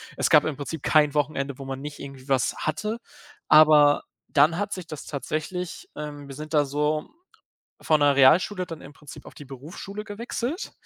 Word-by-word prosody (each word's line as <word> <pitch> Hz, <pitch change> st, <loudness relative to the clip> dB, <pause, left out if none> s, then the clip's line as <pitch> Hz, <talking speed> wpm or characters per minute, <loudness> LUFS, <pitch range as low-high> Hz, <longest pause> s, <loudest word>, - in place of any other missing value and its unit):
es -, -, 0 dB
gab -, -, +6 dB
im 155 Hz, -, -2 dB
Prinzip 145 Hz, +2 st, -6 dB
kein 150 Hz, -1 st, +3 dB
Wochenende, 140 Hz, -2 st, -1 dB
wo 135 Hz, -, -7 dB
man 135 Hz, 0 st, -5 dB
nicht 145 Hz, 0 st, -8 dB
irgendwie 135 Hz, -1 st, -10 dB
was 130 Hz, -3 st, +1 dB
hatte, 210 Hz, +9 st, -3 dB, 0.5 s
aber 150 Hz, -1 st, +6 dB, 0.3 s
dann 150 Hz, +3 st, +4 dB
hat 205 Hz, +1 st, -2 dB
sich 185 Hz, -3 st, -7 dB
das 155 Hz, -3 st, -8 dB
tatsächlich, 160 Hz, +5 st, -5 dB
ähm 145 Hz, -1 st, -7 dB
wir 135 Hz, -, -9 dB
sind 155 Hz, +2 st, -8 dB
da 150 Hz, -1 st, +4 dB
so 150 Hz, +2 st, -1 dB, 0.7 s
von 155 Hz, -1 st, +2 dB
der 145 Hz, -1 st, +4 dB
Realschule 180 Hz, +8 st, +4 dB
dann 165 Hz, -2 st, -9 dB
im 140 Hz, -, -12 dB
Prinzip 145 Hz, 0 st, -13 dB
auf -, -, -12 dB
die -, -, -11 dB
Berufsschule 155 Hz, +10 st, -8 dB
gewechselt. 240 Hz, -, -4 dB
150 Hz, 180 wpm, -25 LUFS, 140-165 Hz, 0.7 s, gab